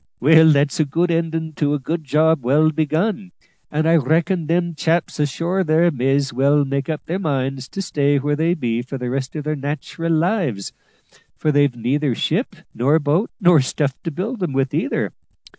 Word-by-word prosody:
Well, 160 Hz, +4 st, +6 dB
that's 145 Hz, +2 st, +1 dB
a 155 Hz, -, +3 dB
good 170 Hz, +5 st, 0 dB
endin' 165 Hz, -1 st, -2 dB
to 145 Hz, -1 st, +1 dB
a -, -, -3 dB
good 155 Hz, +4 st, -4 dB
job 155 Hz, 0 st, +2 dB
well 150 Hz, +5 st, +3 dB
begun, 175 Hz, +6 st, -1 dB, 0.4 s
and 155 Hz, +2 st, 0 dB
I 165 Hz, +1 st, +5 dB
reckon 160 Hz, +4 st, 0 dB
them 170 Hz, +1 st, 0 dB
chaps 165 Hz, +1 st, -1 dB
ashore 170 Hz, +6 st, 0 dB
there 165 Hz, +1 st, +3 dB
may's 135 Hz, 0 st, 0 dB
well 140 Hz, +3 st, +3 dB
make 140 Hz, +1 st, -3 dB
up 155 Hz, -2 st, -4 dB
their 180 Hz, +3 st, -3 dB
minds 135 Hz, -5 st, -2 dB
to 195 Hz, -, -5 dB
stay 145 Hz, -4 st, +1 dB
where 145 Hz, +2 st, 0 dB
they 165 Hz, +3 st, +1 dB
be 120 Hz, -6 st, -2 dB
for 130 Hz, +2 st, -6 dB
the 125 Hz, -1 st, -4 dB
rest 130 Hz, +1 st, -3 dB
of 150 Hz, -, -4 dB
their 155 Hz, +1 st, -2 dB
nat'ral 150 Hz, +4 st, -4 dB
lives, 160 Hz, -, 0 dB, 0.6 s
for 155 Hz, -, 0 dB
they've 145 Hz, -3 st, +2 dB
neither 130 Hz, +3 st, -1 dB
ship -, -, -1 dB, 0.2 s
nor 140 Hz, +6 st, +2 dB
boats, 155 Hz, +7 st, 0 dB
nor 175 Hz, -, +5 dB
stuff 135 Hz, +1 st, -1 dB
to -, -, -4 dB
build 195 Hz, -, -4 dB
'em 175 Hz, -6 st, -2 dB
with 135 Hz, 0 st, 0 dB
either. -, -, -1 dB
150 Hz, 190 wpm, -20 LUFS, 140-165 Hz, 0.6 s, Well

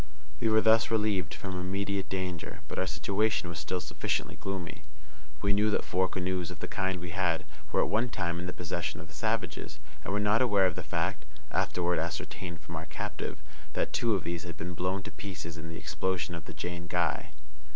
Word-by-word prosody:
We 115 Hz, -, +3 dB
were 110 Hz, 0 st, +6 dB
thus 110 Hz, +1 st, +6 dB
relieved 105 Hz, -7 st, +2 dB
from 95 Hz, -2 st, -3 dB
immediate 100 Hz, +1 st, 0 dB
danger, 90 Hz, -3 st, -2 dB
but -, -, -3 dB
our 95 Hz, -, +2 dB
situation 95 Hz, +4 st, +2 dB
was 85 Hz, -2 st, -3 dB
still 90 Hz, -, 0 dB
sufficiently -, -, -1 dB
gloomy. 95 Hz, -5 st, -4 dB, 0.6 s
We 100 Hz, 0 st, +5 dB
knew 105 Hz, +1 st, +4 dB
that 105 Hz, -, +2 dB
four 95 Hz, 0 st, +3 dB
canoes 90 Hz, -2 st, -1 dB
of -, -, -6 dB
the -, -, -3 dB
kind 95 Hz, -1 st, 0 dB
we 85 Hz, 0 st, -5 dB
had 85 Hz, -2 st, +2 dB, 0.3 s
were -, -, +4 dB
at -, -, +1 dB
one 120 Hz, +3 st, +2 dB
time 85 Hz, -5 st, -1 dB
in 90 Hz, -, -3 dB
the -, -, -1 dB
possession 85 Hz, -4 st, -2 dB
of 80 Hz, -, -8 dB
the -, -, -13 dB
savages, 75 Hz, -, -1 dB, 0.3 s
and -, -, -2 dB
were 105 Hz, -, +2 dB
not 105 Hz, +3 st, +4 dB
aware 105 Hz, -6 st, +5 dB
of 90 Hz, -, +3 dB
the -, -, -3 dB
fact 75 Hz, +1 st, 0 dB, 0.3 s
(afterward 90 Hz, -1 st, +2 dB
ascertained 85 Hz, +1 st, -3 dB
from 80 Hz, -, -6 dB
our 80 Hz, +1 st, -4 dB
captive) 75 Hz, 0 st, -4 dB, 0.3 s
that -, -, 0 dB
two 115 Hz, -3 st, +3 dB
of 95 Hz, -, -1 dB
these 85 Hz, 0 st, -1 dB
had 85 Hz, 0 st, -6 dB
been 90 Hz, +1 st, -3 dB
blown 90 Hz, +3 st, 0 dB
to -, -, -6 dB
pieces 85 Hz, -5 st, -5 dB
in 80 Hz, 0 st, -6 dB
the 80 Hz, -, -5 dB
explosion 90 Hz, -2 st, 0 dB
of 85 Hz, -2 st, -5 dB
the 85 Hz, -, -7 dB
_Jane 85 Hz, +2 st, -3 dB
Guy. 85 Hz, -2 st, +1 dB
90 Hz, 210 wpm, -31 LUFS, 85-100 Hz, 0.6 s, were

